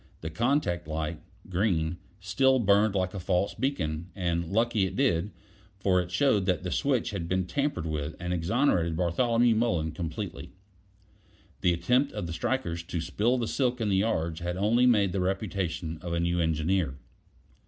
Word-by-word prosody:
The 80 Hz, -, -5 dB
contact 110 Hz, -, 0 dB
light 80 Hz, +1 st, -3 dB, 0.3 s
(green) 90 Hz, -3 st, 0 dB, 0.2 s
still 130 Hz, +7 st, +3 dB
burned 105 Hz, -2 st, +3 dB
like 95 Hz, -1 st, 0 dB
a 100 Hz, -, -4 dB
false 90 Hz, +2 st, 0 dB
beacon; 85 Hz, -, -2 dB
and 85 Hz, -3 st, -1 dB
lucky 110 Hz, -2 st, +2 dB
it 95 Hz, -, -7 dB
did, 85 Hz, +1 st, +1 dB, 0.5 s
for 95 Hz, -2 st, +2 dB
it 90 Hz, -, -6 dB
showed 100 Hz, 0 st, +2 dB
that 90 Hz, -1 st, +1 dB
the 90 Hz, -, -3 dB
switch 135 Hz, -6 st, 0 dB
had 85 Hz, -5 st, -4 dB
been 95 Hz, +1 st, 0 dB
tampered 140 Hz, -, -1 dB
with 75 Hz, -1 st, -3 dB
and 90 Hz, 0 st, -2 dB
exonerated 85 Hz, -, +1 dB
Bartholomew 115 Hz, +7 st, +2 dB
Mullen 90 Hz, -9 st, 0 dB
completely. 90 Hz, +4 st, -6 dB, 1.1 s
The 90 Hz, -, +3 dB
attempt 125 Hz, +11 st, +1 dB
of -, -, -4 dB
the 85 Hz, -, -5 dB
strikers 85 Hz, -4 st, -2 dB
to 85 Hz, 0 st, -4 dB
spill 105 Hz, +10 st, +1 dB
the 120 Hz, -2 st, -1 dB
silk 125 Hz, -1 st, 0 dB
in 110 Hz, -2 st, 0 dB
the 95 Hz, -, +2 dB
yards 85 Hz, -6 st, 0 dB
had 90 Hz, +1 st, -3 dB
only 115 Hz, +6 st, +3 dB
made 105 Hz, -6 st, +4 dB
the 95 Hz, 0 st, -1 dB
reputation 90 Hz, -4 st, -2 dB
of 85 Hz, -1 st, -4 dB
a 85 Hz, -, 0 dB
new 85 Hz, +1 st, 0 dB
engineer. 80 Hz, -2 st, 0 dB
95 Hz, 170 wpm, -28 LUFS, 85-110 Hz, 1.1 s, made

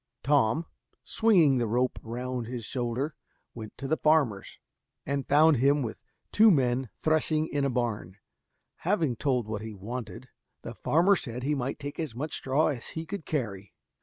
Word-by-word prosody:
Tom, 145 Hz, +2 st, +2 dB, 0.4 s
swinging 170 Hz, -, +4 dB
the 120 Hz, -, 0 dB
rope 125 Hz, +3 st, 0 dB
round 125 Hz, +1 st, -4 dB
his 120 Hz, -2 st, -5 dB
shoulder 125 Hz, +5 st, -2 dB, 0.4 s
went 110 Hz, -2 st, -9 dB
to 135 Hz, -, -5 dB
the 160 Hz, +3 st, +1 dB
farmer's, 145 Hz, -11 st, +1 dB, 0.5 s
and 140 Hz, -1 st, -2 dB
found 150 Hz, +1 st, +5 dB
him 140 Hz, +3 st, +3 dB
with 110 Hz, -, -5 dB, 0.3 s
two 220 Hz, +1 st, +6 dB
men 130 Hz, -, +2 dB
threshing 155 Hz, 0 st, +1 dB
in 145 Hz, -2 st, -1 dB
a -, -, +1 dB
barn. 115 Hz, -7 st, -2 dB, 0.6 s
Having 165 Hz, -, 0 dB
told 125 Hz, -4 st, 0 dB
what 110 Hz, -1 st, -4 dB
he 110 Hz, -1 st, -7 dB
wanted, 115 Hz, +5 st, -7 dB, 0.3 s
the -, -, -6 dB
farmer 175 Hz, +6 st, +3 dB
said 125 Hz, -7 st, -5 dB
he 145 Hz, +3 st, +1 dB
might 135 Hz, -1 st, -2 dB
take 145 Hz, +2 st, -7 dB
as 155 Hz, -8 st, -4 dB
much 150 Hz, +5 st, -4 dB
straw 135 Hz, +4 st, +1 dB
as 130 Hz, -6 st, -4 dB
he 160 Hz, 0 st, -6 dB
could 195 Hz, -2 st, -6 dB
carry. 105 Hz, -, -4 dB
135 Hz, 165 wpm, -28 LUFS, 120-155 Hz, 0.6 s, two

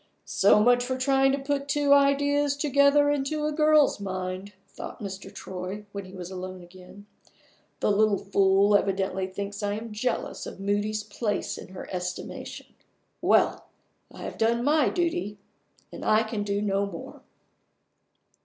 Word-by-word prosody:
"So 200 Hz, +2 st, +4 dB
much 245 Hz, +3 st, +4 dB
for 255 Hz, +1 st, -2 dB
trying 270 Hz, 0 st, +3 dB
to 275 Hz, -, +1 dB
put 280 Hz, 0 st, -2 dB
two 285 Hz, 0 st, +3 dB
ideas 285 Hz, 0 st, +3 dB
together 285 Hz, 0 st, +4 dB
into 290 Hz, +2 st, -1 dB
a 305 Hz, -, 0 dB
girl's 305 Hz, -4 st, +4 dB
mind!" 185 Hz, 0 st, -4 dB, 0.2 s
thought -, -, -9 dB
Mr. 195 Hz, -3 st, -7 dB
Troy, 190 Hz, +3 st, -7 dB
when 200 Hz, -1 st, -6 dB
he 185 Hz, -, -13 dB
was 180 Hz, 0 st, -7 dB
alone 185 Hz, -1 st, -7 dB
again. 185 Hz, +3 st, -14 dB, 0.8 s
"The -, -, +2 dB
little 205 Hz, 0 st, +3 dB
fool 195 Hz, +1 st, +3 dB
evidently 190 Hz, -1 st, 0 dB
thinks 200 Hz, +2 st, -6 dB
I 205 Hz, 0 st, -1 dB
am 220 Hz, +2 st, -6 dB
jealous 225 Hz, +4 st, -3 dB
of -, -, -9 dB
Moody's 205 Hz, +2 st, -1 dB
place 210 Hz, 0 st, -3 dB
in -, -, -9 dB
her 185 Hz, 0 st, -9 dB
estimation. 180 Hz, -1 st, -5 dB, 0.6 s
Well! -, -, +2 dB, 0.4 s
I -, -, -10 dB
have -, -, -7 dB
done 235 Hz, +1 st, +2 dB
my 295 Hz, +1 st, +3 dB
duty 345 Hz, -, -1 dB, 0.5 s
and -, -, -8 dB
I 215 Hz, +1 st, +4 dB
can 220 Hz, -1 st, -4 dB
do 205 Hz, 0 st, -1 dB
no 200 Hz, 0 st, 0 dB
more." 170 Hz, -4 st, -9 dB
210 Hz, 155 wpm, -26 LUFS, 195-275 Hz, 0.8 s, So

